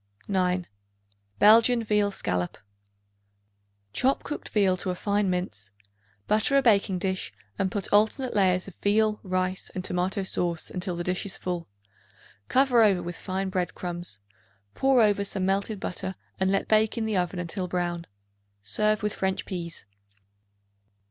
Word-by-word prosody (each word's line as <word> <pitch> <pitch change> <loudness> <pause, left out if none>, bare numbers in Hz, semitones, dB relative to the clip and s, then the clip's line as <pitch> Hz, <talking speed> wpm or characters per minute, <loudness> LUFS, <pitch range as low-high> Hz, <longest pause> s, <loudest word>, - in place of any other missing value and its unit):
9. 180 -2 +1 0.7
Belgian 230 +3 +6
Veal 210 -1 +2
Scallop. 90 - -2 1.4
Chop 265 +2 +2
cooked 295 - -6
veal 195 -3 +3
to 185 +1 -3
a 180 - -1
fine 205 +1 0
mince; 110 - -3 0.6
butter 220 +6 +3
a - - +5
baking 200 -5 +3
dish 185 0 -2 0.3
and 195 -1 +1
put 195 +1 -3
alternate 220 +5 +3
layers 185 -2 +3
of 195 - -9
veal, 210 +1 +2
rice 185 0 -2
and 185 - -3
tomato 185 +2 -1
sauce 175 -3 -1
until 180 -1 -2
dish 180 +3 -1
is 190 - -3
full. 175 - -4 0.8
Cover 255 -2 +4
over 195 -5 +4
with 175 0 -5
fine 190 +1 -3
bread 185 -1 -2
crumbs; 175 - -5 0.5
pour 265 -3 +4
over 205 -1 +2
some 195 -1 -2
melted 200 +2 0
butter 190 0 -4 0.2
and 190 0 +2
let 195 0 +1
bake 215 +1 +3
in 225 - -1
the 220 -1 -1
oven 180 0 0
until 180 +2 -3
brown. 175 -1 -2 0.6
Serve 215 - 0
with 210 - 0
French 190 0 -1
peas. 170 - -6
190 Hz, 150 wpm, -27 LUFS, 180-210 Hz, 1.4 s, Belgian